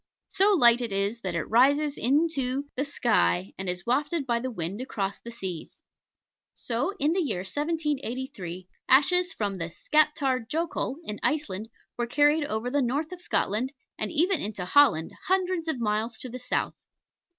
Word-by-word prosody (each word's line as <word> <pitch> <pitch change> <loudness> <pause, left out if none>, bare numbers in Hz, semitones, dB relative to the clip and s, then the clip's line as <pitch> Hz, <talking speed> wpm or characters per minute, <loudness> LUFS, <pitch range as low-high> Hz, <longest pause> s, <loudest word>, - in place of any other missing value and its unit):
So 405 +2 +4
light 240 -6 +6
it 235 -3 -2
is, 200 +4 -1
that 185 -4 -3
it 170 - 0
rises 280 +5 +3
into 275 0 +1
the 275 - -1
sky 95 - +1
and 190 -1 -3
is 180 0 -3
wafted 290 +5 0
by 235 -2 +1
the 260 +2 -3
wind 195 0 -4
across 200 -6 -3
the 235 - -10
seas. 190 -8 -7 0.7
So, 245 - -2
in 305 -1 +2
the 375 - +1
year 220 - -2
1783, 260 - -3 0.2
ashes 360 +7 +4
from 200 - -3
the 165 0 -3
Skaptar 275 - +1
Jokull, 320 -4 -2
in 210 -8 -4
Iceland, 225 -9 -1 0.3
were 240 - 0
carried 295 +4 +3
over 220 +1 -3
the 285 +1 +2
north 280 +6 -1
of 365 -1 -7
Scotland, 255 - 0 0.3
and - - -2
even 340 +2 +2
into 200 -3 -3
Holland, 185 - +4 0.2
hundreds 370 -3 0
of 315 -6 -1
miles 220 +1 -1
to 255 - -7
the 250 +2 -7
south. 250 - -1
255 Hz, 165 wpm, -27 LUFS, 210-300 Hz, 0.7 s, light